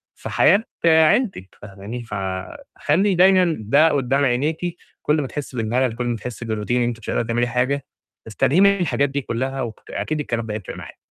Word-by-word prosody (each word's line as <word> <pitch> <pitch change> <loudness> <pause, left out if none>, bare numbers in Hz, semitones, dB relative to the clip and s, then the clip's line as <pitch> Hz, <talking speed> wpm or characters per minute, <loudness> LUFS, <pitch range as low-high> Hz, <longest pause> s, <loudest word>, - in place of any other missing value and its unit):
في - - -8
حياة 200 +8 +4 0.2
عيلتِك، 160 - +3
فاهماني، 105 +4 -8
فخلّي 105 - -2
دايمًا 180 -2 +4
ده 140 +10 +4
قدّام 140 0 +1
عينيكي، 155 +7 -1 0.2
كُلّ 150 0 +1
ما 135 - -3
تحسي 135 -3 -6
بالملل، 120 +2 0
كُلّ 125 0 -3
ما 120 -1 -1
تحسي 115 +1 -7
بالRoutine 110 0 -3
إن 125 0 +2
أنتِ 120 -1 -2
مش 115 - -9
قادرة - - +1
تعملي 120 +1 0
حاجة، 125 +3 -1 0.4
استلهمي 130 - +2
من 200 0 +5
الحاجات 140 -4 +1
دي 140 +1 -2
كُلّها. 130 +3 -3
وأكيد 125 +6 -4
الكلام 120 -6 -2
ده 105 - -5
هيفرِق 105 -3 -6
معاكِ. - - -10
130 Hz, 180 wpm, -21 LUFS, 115-155 Hz, 0.4 s, من